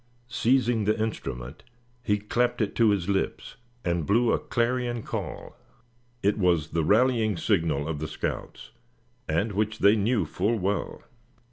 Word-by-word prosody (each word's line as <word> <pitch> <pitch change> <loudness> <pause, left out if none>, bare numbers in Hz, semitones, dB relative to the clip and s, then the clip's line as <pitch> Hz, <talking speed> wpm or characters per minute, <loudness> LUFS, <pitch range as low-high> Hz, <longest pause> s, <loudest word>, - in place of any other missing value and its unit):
Seizing 120 -1 +2
the 110 +1 +1
instrument, 65 - -4 0.4
he 105 -4 +1
clapped 120 +4 0
it 105 -3 0
to 115 -2 +5
his 100 -4 0
lips, 100 -1 -2 0.3
and 85 -2 0
blew 115 +3 +3
a - - +2
clarion 120 -1 -1
call. - - -6 0.7
It 100 +2 +2
was 85 -5 +2
the 80 - 0
rallying 110 0 +3
signal 80 -7 0
of 80 -2 -3
the 75 - -3
scouts, - - -5 0.6
and 85 +8 +1
which 110 +2 -1
they 100 +2 +5
knew 105 -2 +1
full 100 +9 0
well. 100 +1 -2
105 Hz, 145 wpm, -26 LUFS, 85-115 Hz, 0.7 s, to